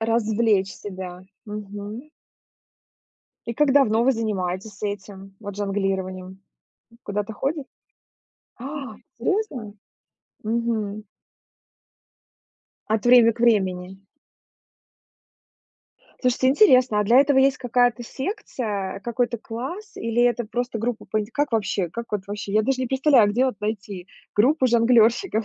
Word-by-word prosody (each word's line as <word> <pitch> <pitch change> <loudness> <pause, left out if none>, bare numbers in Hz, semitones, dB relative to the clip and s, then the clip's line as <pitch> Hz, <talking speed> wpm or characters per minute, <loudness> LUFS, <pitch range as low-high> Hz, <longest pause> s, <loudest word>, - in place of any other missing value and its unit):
Развлечь 220 -3 +1
себя, 185 -2 -8 0.2
мгм. 210 +5 -7 1.4
И 235 - -3
как 290 +1 +3
давно 235 -5 +4
вы 265 - +4
занимаетесь 200 -2 -3
этим 195 -1 -6
вот 205 -2 -7
жонглированием? 190 -2 -3 0.6
Куда 205 +1 -2
то 220 +1 -8
ходит 280 +5 -2 0.9
А! 275 +1 -6 0.2
Серьезно? 285 - -2 0.7
Мгм. 220 -2 -2 1.8
От 220 +1 0
время 240 -2 +7
к 230 - -13
времени. 190 -5 +1 2.2
Слушайте, 255 0 +2
интересно. 255 - +5
А - - +1
для 240 +6 +6
этого 280 -1 +3
есть 270 0 +4
какая-то 245 -1 +1
секция, 225 - -4
какой-то 235 +2 -1
класс 270 - -7
или 230 - 0
это 240 -1 +2
просто 245 +1 -3
группа 230 0 -3
по 215 - 0
инт 210 - -5
как 290 -2 -1
вообще, 200 -4 0
как 235 +7 -6
вот 205 -2 -1
вообще? 205 0 -5
Я 215 +1 +3
даже 260 +2 0
не 255 - -1
представляю, 265 -4 +4
где 245 +5 +2
вот 245 -6 -4
найти 200 -3 -4 0.3
группу 260 +6 +3
жонглёрщиков? 230 - +3
225 Hz, 120 wpm, -23 LUFS, 205-250 Hz, 2.2 s, время